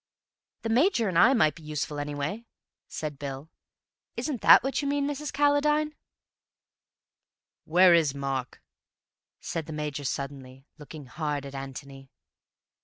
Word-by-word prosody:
"The 225 - -2
Major 245 - +3
and 180 - -4
I 260 +9 +6
might 155 - +3
be 165 - -15
useful 150 -1 -4
anyway," 145 +10 -4 0.4
said 150 -3 -6
Bill. 140 +2 -7 0.7
"Isn't 280 -7 -3
that - - +8
what 270 +2 -1
you 285 - -3
mean, 285 0 0
Mrs. 290 +1 -4
Calladine?" 295 +1 +2 1.7
"Where 180 +2 +6
is 155 -5 +3
Mark?" 135 -2 -4 0.8
said 165 -2 -4
the 160 - -6
Major 150 -1 -4
suddenly, 135 -1 -6
looking 150 0 -10
hard 145 +1 -4
at 140 - -9
Antony. 135 0 -9
150 Hz, 130 wpm, -27 LUFS, -, 1.7 s, that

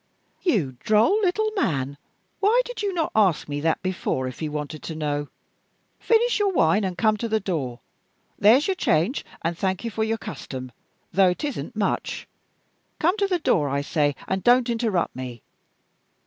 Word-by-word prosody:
"You 165 - 0
droll 225 - +3
little 430 +3 +1
man, 140 - 0 0.4
why 450 +5 +4
did - - -6
you 405 -1 0
not 335 -4 -1
ask 195 -7 +3
me 145 0 -3
that 160 +3 0
before, 175 -8 -1
if 130 - -8
you 155 -2 -2
wanted 150 0 -5
to 160 - -6
know? 145 -2 -2 0.7
Finish 470 +1 +3
your 405 -1 +2
wine, 205 - +3
and 185 -2 -2
come 215 0 +3
to 230 - -3
the 220 0 +2
door. 150 - -3 0.6
There's 235 +9 +6
your 385 - +2
change, 220 - +1 0.2
and 165 +1 0
thank 190 +2 -1
you 230 - -3
for 220 - -1
your 225 +1 0
custom, 130 - -7 0.4
though 190 -1 +5
it 180 - -3
isn't 285 -4 -4
much. 205 -2 -2 0.7
Come 350 +5 +2
to 400 -1 +2
the 365 -2 +1
door, 155 - +1
I 140 +1 0
say, 145 -1 0
and 190 0 -1
don't 245 0 +4
interrupt 225 -7 0
me! 125 -3 -7
195 Hz, 175 wpm, -24 LUFS, -, 0.7 s, There's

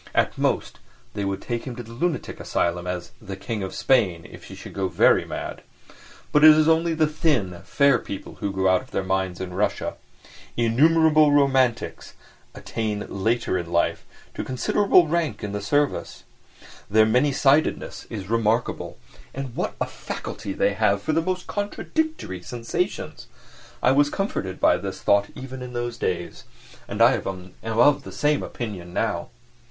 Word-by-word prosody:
At - - +2
most, - - -1 0.3
they 105 - -3
would 100 0 -3
take 120 -1 -3
him 125 - -5
to 120 - -7
the 115 - -13
lunatic 170 +7 -2
asylum 85 +1 -1
as 90 -1 -4
"the 95 - -6
King 105 +3 -4
of 95 -1 -5
Spain" 100 -11 +2
if - - -13
he - - -10
should - - -10
go 95 -1 -1
very 90 - +4
mad. - - -6 0.7
But 150 - +4
it 155 0 +10
is 155 0 +4
only 165 0 +3
the 155 0 +3
thin, 145 - 0
fair 140 -4 +3
people 100 - -8
who 100 - -2
go 95 0 0
out 95 -1 +4
of - - -16
their 95 - -2
minds 95 -1 -1
in 90 -1 -5
Russia. 100 +3 -1 0.6
Innumerable 155 +6 +4
"romantics" 135 -4 +1 0.4
attain 105 -2 -3
later 105 -1 0
in 85 -1 -6
life 85 0 +1 0.3
to - - -4
considerable 175 +7 +3
rank 165 -2 -1
in 105 - -3
the 100 0 -3
service. 145 +7 -1 0.7
Their 110 +1 +5
many 125 +6 +3
sidedness 140 +3 +1
is 100 -4 -6
remarkable! 115 +1 0 0.4
And 135 -3 -5
what - - -2
a - - +1
faculty 100 -2 -6
they 100 - +1
have 100 -1 +1
for - - 0
the 165 - +2
most 185 +1 -2
contradictory 205 - -3
sensations! 115 +5 -4 0.6
I 125 - +5
was 145 +2 +4
comforted 100 - -3
by - - +4
this - - -6
thought 100 0 +2
even 130 0 -8
in 125 0 -7
those 120 -1 -3
days, 90 -1 -3 0.4
and - - +2
I - - +7
am 95 -1 -5
of 120 +6 +3
the - - -10
same 150 0 +1
opinion 95 -7 -6
now. - - -1
115 Hz, 170 wpm, -24 LUFS, 95-145 Hz, 0.7 s, it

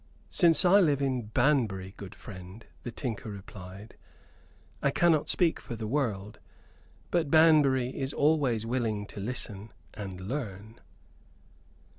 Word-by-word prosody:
"Since 170 -2 +4
I 190 +3 +7
live 150 -7 +3
in 130 -5 -1
Banbury, 105 -7 +1
good 100 -2 -9
friend," 95 +2 -11 0.2
the 120 - -6
tinker 115 -2 -5
replied, 100 0 -10 0.8
"I - - +3
cannot 160 +1 +2
speak 170 -3 +2
for 120 - -7
the 110 -1 -5
world. 105 -5 -2 0.7
But 165 -4 +1
Banbury 145 -5 +5
is 135 0 -2
always 145 -8 +2
willing 115 -4 -1
to 100 - -10
listen, 105 -1 -4 0.2
and 95 -4 -7
learn." 110 -1 -5
120 Hz, 125 wpm, -29 LUFS, 105-145 Hz, 0.8 s, I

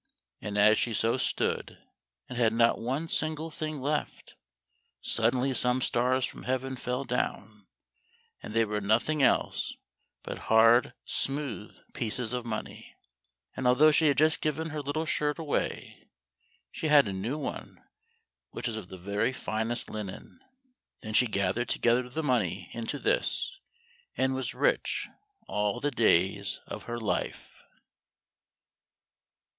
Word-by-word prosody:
And 105 -1 -4
as 105 +1 +6
she 115 -2 0
so 115 +4 +2
stood, - - -1 0.5
and 125 - -7
had 115 -2 +3
not 115 0 +3
one 135 +8 -2
single 155 0 -1
thing 155 -1 -4
left, 145 +3 -3 0.7
suddenly 125 +4 +1
some 125 0 +2
stars 125 +1 +1
from - - -8
heaven 130 +1 -2
fell 125 +1 -3
down, 105 -5 -3 0.7
and 105 - -8
they 115 0 +4
were 105 0 -2
nothing 120 +9 +2
else 135 - +2 0.5
but - - -6
hard 115 +2 +5
smooth 135 -6 -3 0.2
pieces 120 +1 -2
of 125 -1 -3
money, 110 -1 -6 0.6
and 130 - -1
although 145 +5 +6
she 155 +1 +4
had 140 - +3
just 155 +1 +3
given 160 +1 -1
her 155 -1 -3
little 145 +3 -2
shirt 150 -1 0
away, 160 -3 -3 0.6
she 160 - -3
had 145 -5 +6
a 100 - -3
new 110 +10 -3
one 150 - -6 0.7
which - - -6
was 115 -2 -3
of 105 -5 -7
the 95 - -8
very 100 +6 -1
finest 115 -1 -2
linen. 105 - -7 0.6
Then 110 - -5
she 125 +3 +5
gathered 100 +3 0
together 125 +1 +2
the 160 +6 -3
money 105 - 0
into 115 +5 -4
this, - - 0 0.6
and 130 0 +2
was 130 -2 -3
rich - - +1 0.4
all 105 -1 0
the 145 - -1
days 100 -4 +2
of - - -7
her 120 - -4
life. 110 -3 -3
125 Hz, 140 wpm, -29 LUFS, 110-145 Hz, 0.7 s, as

